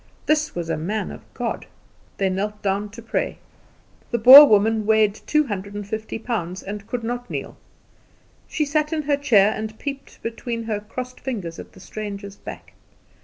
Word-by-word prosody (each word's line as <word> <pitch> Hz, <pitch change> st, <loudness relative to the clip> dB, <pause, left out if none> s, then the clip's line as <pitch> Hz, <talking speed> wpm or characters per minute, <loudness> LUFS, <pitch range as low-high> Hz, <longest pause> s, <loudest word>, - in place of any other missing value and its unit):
This 305 Hz, 0 st, +1 dB
was 170 Hz, -2 st, -3 dB
a -, -, -1 dB
man 205 Hz, +7 st, -3 dB
of -, -, -12 dB
God. -, -, -3 dB, 0.5 s
They 195 Hz, -, +1 dB
knelt 205 Hz, +3 st, -3 dB
down 200 Hz, +1 st, -1 dB
to 230 Hz, +3 st, -11 dB
pray. 230 Hz, -, -2 dB, 0.7 s
The 235 Hz, -, 0 dB
Boer 265 Hz, +6 st, +11 dB
woman 215 Hz, 0 st, +3 dB
weighed 215 Hz, -2 st, +4 dB
two 300 Hz, +7 st, 0 dB
hundred 200 Hz, -3 st, -5 dB
and 205 Hz, -1 st, -5 dB
fifty 220 Hz, +1 st, -4 dB
pounds, 195 Hz, -6 st, -4 dB
and 205 Hz, +1 st, -7 dB
could 245 Hz, -1 st, -4 dB
not 245 Hz, +1 st, -4 dB
kneel. -, -, -5 dB, 0.9 s
She 305 Hz, -, -1 dB
sat 300 Hz, +1 st, 0 dB
in 315 Hz, -1 st, -1 dB
her 290 Hz, 0 st, +2 dB
chair, 220 Hz, -7 st, +4 dB
and 220 Hz, 0 st, -5 dB
peeped 275 Hz, -1 st, -7 dB
between 230 Hz, 0 st, -4 dB
her 220 Hz, -2 st, -2 dB
crossed 250 Hz, +4 st, -7 dB
fingers 200 Hz, -11 st, -5 dB
at -, -, -11 dB
the -, -, -15 dB
stranger's 200 Hz, +1 st, -7 dB
back. -, -, -10 dB
220 Hz, 175 wpm, -23 LUFS, 200-250 Hz, 0.9 s, Boer